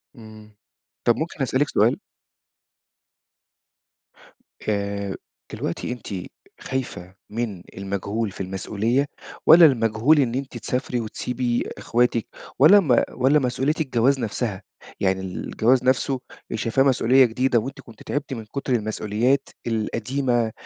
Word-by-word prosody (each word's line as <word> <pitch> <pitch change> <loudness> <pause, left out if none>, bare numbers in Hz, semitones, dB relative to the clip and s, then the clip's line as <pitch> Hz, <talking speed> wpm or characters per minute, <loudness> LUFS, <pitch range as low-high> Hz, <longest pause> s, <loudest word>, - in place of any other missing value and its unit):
امم. 110 -2 -14 0.5
طَب - - +4
ممكن - - -4
أسألِك - - +1
سؤال؟ - - +3 2.7
آآ، 100 -1 -2 0.4
دلوقتي - - -3
أنتِ 125 -2 -7 0.5
خايفة 95 -8 -5
من 105 -5 -4
المجهول 100 +2 -3
في 95 - -8
المسؤولية، 105 +8 -1 0.4
والّا 165 +1 +10
المجهول 120 +2 +3
إن 125 -4 +1
أنتِ 135 -2 -4
تسافري 125 +2 -2
وتسيبي 120 +2 -2
إخواتِك، 120 -1 +1 0.3
والّا 160 +9 +8
ما 140 -11 +3
والّا 135 +4 +3
مسؤولية 130 +2 0
الجواز 135 -1 +2
نَفسها، 110 -3 -3 0.4
يعني 95 -1 +1
الجواز 110 +6 0
نَفسه 130 +1 +1 0.4
شايفاه 115 +3 +1
مسؤولية 130 -1 +5
جديدة، 125 +1 +1
وأنتِ 135 +5 -6
كنتِ 115 -4 -15
تعبتِ 145 -1 -3
من 115 -3 -6
كتر 135 +4 -3
المسؤوليات 110 +4 0 0.2
القديمة 115 +2 0
120 Hz, 115 wpm, -23 LUFS, 110-130 Hz, 2.7 s, والّا